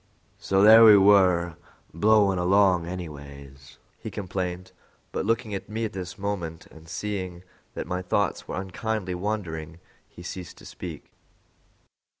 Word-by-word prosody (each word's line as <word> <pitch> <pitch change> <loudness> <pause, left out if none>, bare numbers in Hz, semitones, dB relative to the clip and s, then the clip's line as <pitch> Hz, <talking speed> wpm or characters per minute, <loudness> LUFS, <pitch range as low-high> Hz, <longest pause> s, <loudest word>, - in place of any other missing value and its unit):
"So 95 0 +2
there 110 +2 +9
we 105 -2 +9
were 90 -4 +4 0.4
blowin' 100 +1 +3
along 90 -1 +3
anyways," 70 -6 -9 0.2
he - - -6
complained; 90 -2 -5 0.4
but 95 - -3
looking 115 -1 0
at 100 - -6
me 110 +1 -2
at 110 - -5
this 90 -2 -6
moment, 90 -5 -4
and 80 0 -15
seeing 95 -3 -5 0.3
that - - -4
my 90 0 -3
thoughts 95 +1 -1
were - - -4
unkindly 95 +1 -3
wandering, 90 -5 -4 0.3
he 90 - -13
ceased 90 0 -8
to - - -15
speak. - - -9
95 Hz, 140 wpm, -25 LUFS, 85-105 Hz, 0.4 s, there